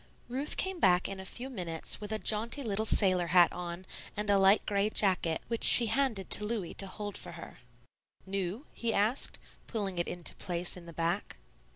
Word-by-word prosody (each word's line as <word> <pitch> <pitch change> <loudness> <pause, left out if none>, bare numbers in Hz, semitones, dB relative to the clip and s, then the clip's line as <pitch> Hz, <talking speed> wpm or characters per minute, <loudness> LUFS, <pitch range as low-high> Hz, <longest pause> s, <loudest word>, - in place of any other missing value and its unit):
Ruth 270 +4 -3
came 380 -2 -1
back 180 - +3
in 195 -1 -7
a 190 - -8
few 245 +6 -4
minutes 175 -11 0
with 210 0 -6
a 220 - 0
jaunty 225 +6 0
little 220 -1 0
sailor 185 -5 +3
hat 175 0 +4
on 175 +1 -7 0.3
and 210 0 -1
a 200 - +4
light 195 +2 +4
gray 200 0 0
jacket, 185 -6 +2
which 230 -1 -3
she 240 - +9
handed 225 -4 -1
to - - +3
Louis 210 -5 -3
to 195 - -3
hold 205 +1 -7
for - - -6
her. 170 - -11 0.7
"New?" 195 - -4
he 230 -1 -2
asked, 220 +7 0 0.3
pulling 195 -6 -3
it 170 - -1
into 175 -1 -3
place 175 0 -3
in 175 -2 -12
the - - -9
back. 170 +4 -3
200 Hz, 195 wpm, -30 LUFS, 180-220 Hz, 0.7 s, she